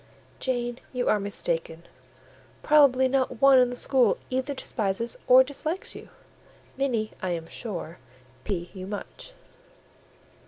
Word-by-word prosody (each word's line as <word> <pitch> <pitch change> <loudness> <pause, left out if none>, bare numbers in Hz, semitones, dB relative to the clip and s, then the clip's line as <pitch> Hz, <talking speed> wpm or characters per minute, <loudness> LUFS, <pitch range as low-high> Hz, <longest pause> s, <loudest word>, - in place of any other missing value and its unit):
"Jane, 245 -1 -2
you 250 -1 -2
are 210 - +3
mistaken: 170 -4 -3 0.8
probably 275 -4 +5
not 260 -2 -1
one 275 0 +7
in 250 -1 +4
the 245 - -5
school 245 -4 +3
either 260 +2 -2
despises 225 -2 -1
or 255 +1 +8
dislikes 305 +6 -4
you: - - -11 0.7
many, 240 -6 -1
I 185 - -2
am 165 -2 -4
sure, 175 -5 -7 0.4
pity 175 -3 -4
you 185 -1 -8
much." 205 - -8
245 Hz, 125 wpm, -26 LUFS, 195-260 Hz, 0.8 s, or